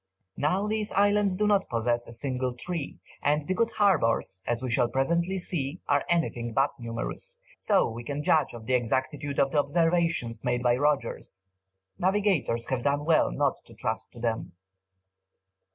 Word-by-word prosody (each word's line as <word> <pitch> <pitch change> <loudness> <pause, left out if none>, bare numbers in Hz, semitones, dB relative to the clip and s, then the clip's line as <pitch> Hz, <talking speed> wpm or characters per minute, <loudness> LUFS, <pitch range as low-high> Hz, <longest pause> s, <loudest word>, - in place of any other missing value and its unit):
Now 180 +8 +1
these 215 0 -1
islands 205 -1 +3
do 210 - +1
not 205 -2 +2
possess 120 +1 0
a - - -9
single 125 0 -2
tree, 165 +3 -5 0.2
and 150 0 +1
the 185 - +1
good 230 +3 +1
harbours, 115 - +2
as 120 +1 -1
we 130 - -2
shall 120 +1 +3
presently 170 +9 0
see, 170 -3 -3
are 145 0 +2
anything 120 -9 0
but 135 +4 +2
numerous, 120 - -5 0.2
so 205 -2 +3
we 115 +1 -6
can 145 +4 -4
judge 155 +1 +2
of 115 -1 -9
the 130 - -1
exactitude 130 +4 -1
of 135 - +3
the 150 - +2
observations 165 -6 +1
made 125 0 0
by 120 -1 +4
Rogers. 130 -8 -1 0.5
Navigators 185 - +1
have 130 -2 0
done 145 +2 0
well 160 -1 +3
not 140 -2 +1
to 115 - -15
trust 110 0 -3
to 120 - -11
them. 115 -1 -2
140 Hz, 170 wpm, -27 LUFS, 120-175 Hz, 0.5 s, by